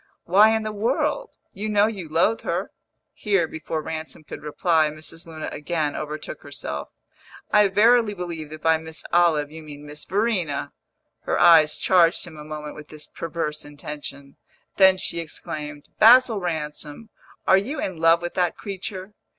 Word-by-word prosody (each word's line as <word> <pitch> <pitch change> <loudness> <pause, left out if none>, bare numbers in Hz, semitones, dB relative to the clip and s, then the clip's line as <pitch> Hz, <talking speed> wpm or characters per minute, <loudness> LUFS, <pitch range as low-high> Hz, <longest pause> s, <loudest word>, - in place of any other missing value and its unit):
"Why 200 +5 +6
in 220 - -1
the 215 - -3
world? 260 - -1 0.2
You 210 +2 -4
know 205 -1 +4
you 195 -7 -4
loathe 170 +8 +2
her!" - - -3 0.4
Here, 195 -6 +1
before 160 0 -5
Ransom 155 0 -6
could - - -9
reply, 155 +1 +1
Mrs. 160 +2 -7
Luna 160 -1 -6
again 150 -1 -2
overtook 155 0 -6
herself. 70 - -6 0.6
"I 210 -1 +6
verily 220 +2 +4
believe 170 -4 -6
that 155 0 -10
by 160 0 +4
Miss 160 0 -9
Olive 160 -4 +3
you 160 +1 -9
mean 150 -1 -11
Miss 150 0 -9
Verena!" 190 -7 -1 0.5
Her - - 0
eyes 160 -3 +7
charged 175 -3 +3
him 170 -2 -11
a 150 - -8
moment 150 0 -7
with 150 -1 -11
this 155 -1 -9
perverse 160 -2 -4
intention; 145 -1 -9 0.4
then 190 -1 +7
she 170 -2 -3
exclaimed, 150 -2 -7
"Basil 235 0 +7
Ransom, 155 +3 -5 0.3
are 190 - +6
you 270 +10 -4
in 185 -3 -3
love 165 +1 +4
with 175 - -4
that 180 -2 0
creature?" 195 0 -6
165 Hz, 160 wpm, -23 LUFS, 150-195 Hz, 0.6 s, eyes